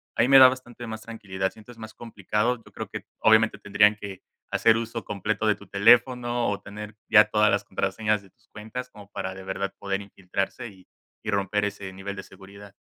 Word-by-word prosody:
A - - +3
mí - - +3
me 135 0 +9
da 130 - +11
bastante 120 -2 -5
más 110 0 -6
tranquilidad. 100 -4 -4
Sientes 115 +2 -15
más 110 -1 -9
complicado, 110 +1 -1
yo - - -16
creo - - -7
que, - - -7
obviamente, 110 -1 +4
tendrían 105 +1 +4
que 100 -3 -9 0.3
hacer 115 0 +4
uso 115 0 -5
completo 105 +2 -2
de 105 - +4
tu 100 - -16
teléfono 120 +4 +3
o 100 -1 -2
tener 105 +1 -9
ya 110 -1 +7
todas 105 0 +3
las - - +1
contraseñas 105 -2 -1
de 95 - -20
tus - - -35
cuentas 110 +4 -7
como 105 -1 -15
para 95 -2 -4
de 95 - -9
verdad 95 +1 -4
poder 100 0 -3
infiltrarse, 95 +3 -4
y 95 -2 -18 0.4
y 105 - -4
romper 100 0 0
ese 100 -2 -5
nivel 100 +1 -6
de 95 - -7
seguridad. 100 +2 -14
105 Hz, 205 wpm, -26 LUFS, 100-115 Hz, 0.4 s, da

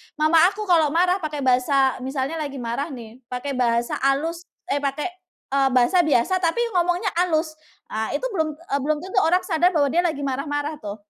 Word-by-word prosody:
mama 310 +1 +4
aku 425 +2 -4
kalau 340 -6 +3
marah 360 +2 +3
pakai 300 -4 -4
bahasa 265 +1 +2
misalnya 270 +4 -3
lagi 285 -2 -4
marah 245 +3 -3
nih 240 -5 -10
pakai 250 +3 -4
bahasa 240 -2 0
halus 320 +6 -1 0.2
eh, 285 - +1
pakai, 280 +1 -2 0.5
eee, 275 0 +3
bahasa 250 +9 +4
biasa 300 +7 +2
tapi 355 +7 +1
ngomongnya 360 +1 +1
halus, 320 -3 +1 0.4
eee, 220 +1 -2
itu - - -3
belum 320 -6 0
eee, 305 -3 -3
belum 300 +3 0
tentu 380 +1 0
orang 360 +3 +2
sadar 350 0 +1
bahwa 285 -3 +2
dia 340 - +2
lagi 310 -5 -1
marah-marah 290 +2 -3
tuh, 205 -7 -6
295 Hz, 185 wpm, -23 LUFS, 270-340 Hz, 0.5 s, mama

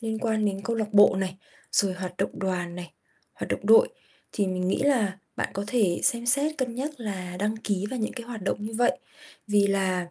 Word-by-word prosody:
liên 220 -1 -2
quan 220 -2 0
đến 195 -1 -1
câu 230 - -1
lạc 220 -2 -1
bộ 205 -2 +7
này, 190 -1 -3 0.3
rồi 195 -2 +3
hoạt 180 -1 -5
động - - -2
đoàn 180 -2 -2
này, 175 -1 -8 0.4
hoạt - - -6
động - - 0
đội 465 +2 +7 0.4
thì 205 - 0
mình 185 -1 -1
nghĩ - - +1
là 225 -9 +2 0.2
bạn - - -1
có 200 +1 -2
thể 210 -8 +1
xem 235 0 +2
xét 285 +5 +2
cân 250 -3 -1
nhắc 285 +3 -4
là 185 -5 -5
đăng 210 +4 -1
ký 205 -3 -2
vào 260 - -3
những 220 - -1
cái 235 -3 -7
hoạt 230 -5 -7
động 200 - -2
như 225 - -6
vậy 245 - +3 0.5
vì 205 -1 +4
là, 185 -3 0
205 Hz, 225 wpm, -26 LUFS, 185-235 Hz, 0.5 s, bộ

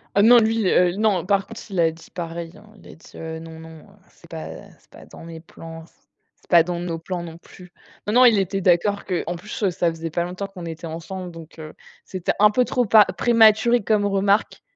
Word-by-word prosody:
Ah 200 - +4
non! 240 +3 +7
Lui, 220 -2 +1
heu, 180 0 +3
non, 205 -5 +1
par 195 0 +1
contre, 225 - -10
il 190 -3 -4
a 165 -1 +3
dit 160 +1 -16
pareil, 170 -1 -6
hein, 215 - -18
il - - -17
a - - -12
dit, 165 - -19
heu: 160 0 -7
«Non, 160 0 -11
non, 160 0 -12
heu, - - -19 0.3
c'est - - -21
pas 80 0 -7 0.3
c'est - - -31
pas - - -15
dans - - -14
mes 165 -1 -10
plans, 165 0 -12
c'est - - -27 0.5
c'est - - -29
pas 170 -2 +7
dans 175 0 -4
nos 170 -2 -4
plans 175 +1 -5
non 165 -1 -9
plus». 180 0 -16 0.4
Non, 210 - -1
non, 250 +2 +6
il 230 -4 +5
était 195 +1 -2
d'accord 185 +3 +1
que 180 -2 -2
en 175 - -3
plus, 210 +7 -8
heu, 195 - +2
ça 175 -1 0
faisait 165 0 -6
pas 170 +2 -1
longtemps 180 +3 -5
qu'on 185 -3 -10
était 165 0 -7
ensemble, 175 +3 -7
donc 165 -1 -13
heu, 155 0 -9 0.3
c'était 185 -3 -3
un 210 +1 +6
peu 250 +4 +2
trop 250 -2 0
pa 210 0 +6
prématuré 230 0 +4
comme 210 -1 +1
remarque. 200 +1 0
180 Hz, 245 wpm, -22 LUFS, 165-205 Hz, 0.5 s, non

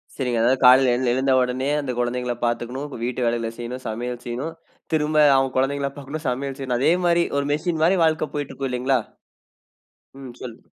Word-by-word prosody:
சரிங்க 125 -4 -1
அதாவது 130 +3 +3
காலைல 130 +1 +7
எழ 125 - -1
எழுந்த 130 +1 +2
உடனே, 125 +2 -1
அந்த 130 -3 -3
குழந்தைங்கள 125 0 -1
பாத்துக்கணும். 120 +4 -3
வீட்டு 125 +1 -2
வேலைகள 115 -1 -1
செய்யணும். 125 +2 -6
சமையல் 120 +2 -4
செய்யணும். 130 +7 -4 0.4
திரும்ப 155 0 +1 0.2
அவுங்க 135 -1 0
குழந்தைங்கள 140 +1 0
பாக்கணும். 145 +3 -7
சமையல் 135 +2 -3
செய்யணும். 130 -2 -1
அதே 150 - +3
மாரி 170 0 +3
ஒரு 140 - 0
மிஷின் 160 +1 -2
மாரி 185 +3 +4
வாழ்க்க 155 -1 0
போயிட்டுருக்கும் 140 -2 -4
இல்லைங்களா? 125 +1 +1 1.2
ம். 130 -3 -9
சொல்லு 120 -2 -8
130 Hz, 170 wpm, -23 LUFS, 125-140 Hz, 1.2 s, காலைல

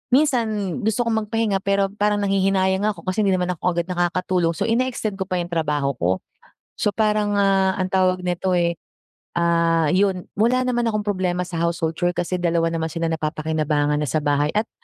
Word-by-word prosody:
minsan 265 -6 +3 0.3
gusto 225 +2 0
kong 220 -2 0
magpahinga 220 -3 0
pero 195 0 0
parang 205 0 0
nanghihinayang 195 0 +1
nga 210 - 0
ako. - - -13
Kasi 185 - -2
hindi 195 -1 +3
naman 180 0 0
ako 180 - -7
agad 170 +1 -1
nakakatulog 175 -1 0
so - - -2
ine-extend 230 -4 -1
ko 190 - -2
pa 185 - -2
yung 175 0 -7
trabaho 150 -4 0
ko. 90 +2 +2 0.6
So, 210 - 0
parang, 210 -1 +1
ah, 195 -1 +2
ang 185 -1 -2
tawag 185 -1 +1
nito 180 +1 0
eh, 170 -1 0 0.5
ah, 170 -2 +2
yun 185 0 +1
wala 245 +4 +3
naman 240 -1 0
akong 215 -2 0
problema 185 -3 0
sa 175 - -5
household 165 -1 -1
chore 175 0 +1
kasi 180 +1 -2
dalawa 170 -1 +1
naman 165 -1 -2
sila 165 0 -2
napapakinabangan 155 -2 0
na 150 - -1
sa 155 +2 -1
bahay. 145 +1 +1
At 215 +2 0
185 Hz, 190 wpm, -22 LUFS, 170-205 Hz, 0.6 s, minsan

